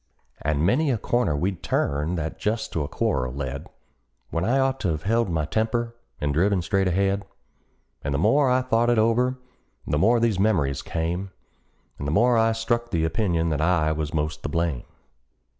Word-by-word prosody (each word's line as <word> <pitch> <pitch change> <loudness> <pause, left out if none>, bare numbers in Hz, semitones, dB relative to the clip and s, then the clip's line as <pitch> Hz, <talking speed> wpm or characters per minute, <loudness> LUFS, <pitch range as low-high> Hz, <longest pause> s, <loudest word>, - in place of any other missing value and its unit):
And 75 +1 0
many 140 - +2
a 125 - +1
corner 110 -8 0
we'd 90 +3 -2
turned 75 +5 -1
that 80 0 -4
just 110 +2 -2
to 80 - 0
a - - -4
quarrel 65 -3 -1
led, 65 -2 -5 0.6
When 85 - -1
I 120 +7 +2
ought 135 0 +1
to 85 -5 0
've 75 - -14
held 115 +1 +1
my 80 -3 0
temper, 115 - -1 0.3
and 75 -1 -1
driven 95 +3 +2
straight 95 +3 +1
ahead; 100 +2 +1 0.8
And 70 - -2
the 70 - 0
more 130 - +3
I 130 0 +2
thought 120 -1 +2
it 120 - +3
over 120 +4 +2 0.5
the 75 - 0
more 115 +7 +4
these 115 -5 +1
memories 85 -11 +1
came, 85 +4 -3 0.7
And 70 - -4
the - - -1
more 120 +8 +4
I 115 0 +3
struck 120 +1 -1
the 80 -5 0
opinion 85 -1 0
that 75 -1 -1
I 80 -2 +2
was 75 -1 -2
the - - -7
most 75 0 -2
to - - -4
blame. 80 -5 -1
95 Hz, 190 wpm, -24 LUFS, 80-115 Hz, 0.8 s, more